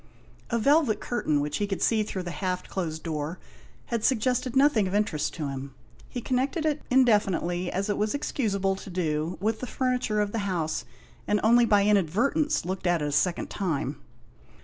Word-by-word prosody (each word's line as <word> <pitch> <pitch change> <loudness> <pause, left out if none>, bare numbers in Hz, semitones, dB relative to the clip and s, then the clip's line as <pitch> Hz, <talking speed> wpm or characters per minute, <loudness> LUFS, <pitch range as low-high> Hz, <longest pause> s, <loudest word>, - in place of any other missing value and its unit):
A 235 - +1
velvet 280 -1 +3
curtain 155 -12 0
which 145 0 -2
he 205 - -1
could 195 -2 -3
see 225 -2 +3
through 195 -3 -3
the 175 - -5
half 185 0 -3
closed 160 -4 -4
door 155 +1 -3 0.6
had 230 -2 0
suggested 255 +1 +1
nothing 265 -7 +4
of 185 - -2
interest 205 -8 0
to 155 -4 -3
him. 135 0 -6 0.3
He 245 - -5
connected 270 +6 -1
it 305 -1 0
indefinitely, 195 -8 +2
as 195 +2 -1
it 205 - -1
was 210 +5 0
excusable 200 -9 0
to 195 - -9
do, 165 -2 -1
with 215 +3 0
the 255 - -5
furniture 250 -5 0
of 205 -1 0
the 225 - -2
house, 175 -6 -2 0.4
and 210 - +2
only 235 +2 +6
by 205 -2 +4
inadvertence 210 - +2
looked 185 0 -3
at 175 -3 +2
it 145 - -1
a - - -4
second 170 +4 0
time. 150 -7 -2
200 Hz, 185 wpm, -27 LUFS, 175-240 Hz, 0.6 s, only